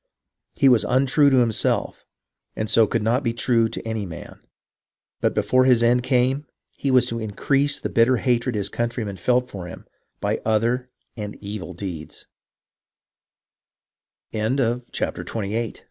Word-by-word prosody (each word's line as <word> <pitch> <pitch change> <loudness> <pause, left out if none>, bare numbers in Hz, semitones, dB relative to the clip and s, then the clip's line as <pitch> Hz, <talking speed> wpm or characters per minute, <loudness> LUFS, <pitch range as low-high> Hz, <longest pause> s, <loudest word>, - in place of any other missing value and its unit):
He 140 - +4
was 120 -5 +5
untrue 135 +5 +3
to 135 - +3
himself, 115 -3 0 0.5
and 110 - -2
so 115 0 +5
could 115 0 -1
not 120 +4 +2
be 115 -4 -1
true 115 -1 +2
to 115 0 -5
any 110 -2 -2
man. 85 0 -10 0.8
But - - 0
before 130 0 +3
his 125 -3 +4
end 120 +1 +4
came, 130 +3 +1 0.2
he 140 - -3
was 130 -2 +4
to 115 - -3
increase 135 +7 0
the - - -3
bitter 120 +2 +3
hatred 120 -1 0
his 100 -2 -1
countrymen 115 -3 -3
felt 125 +7 +1
for 95 -7 -8
him - - -10 0.3
by - - -1
other 115 +3 0 0.3
an 105 -1 -5
120 Hz, 130 wpm, -23 LUFS, 110-130 Hz, 0.8 s, was